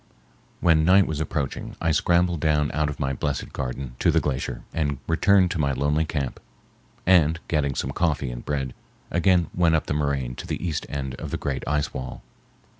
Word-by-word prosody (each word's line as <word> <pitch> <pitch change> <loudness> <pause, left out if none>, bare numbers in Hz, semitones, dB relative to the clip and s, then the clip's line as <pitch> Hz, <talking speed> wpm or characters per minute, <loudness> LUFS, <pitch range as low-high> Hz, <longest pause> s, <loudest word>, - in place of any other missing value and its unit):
When 80 -2 +4
night 95 +3 +6
was 75 -2 -3
approaching 70 -3 -3
I 80 - +1
scrambled 85 +2 +2
down 75 -1 +2
out 75 +1 +1
of 75 - -6
my 70 -2 0
blessed 70 +1 -3
garden 65 -1 -4
to - - +3
the - - +4
glacier, 65 -3 -3
and 75 -4 0
returned 90 +2 +4
to 85 - -2
my 70 -2 +1
lonely 75 +4 +1
camp, 70 -5 -3 0.7
and, 85 -3 +4
getting 70 -4 0
some 65 - -2
coffee 70 -5 0
and - - -7
bread, 70 -3 -2 0.4
again 90 0 +3
went 85 -2 +3
up 80 - 0
the - - -2
moraine 70 -4 -1
to - - -7
the 90 - -3
east 80 - -3
end 65 -2 -3
of - - -5
the - - -2
great 70 -2 -3
ice 75 0 0
wall. 65 -1 -6
75 Hz, 190 wpm, -25 LUFS, 70-80 Hz, 0.7 s, night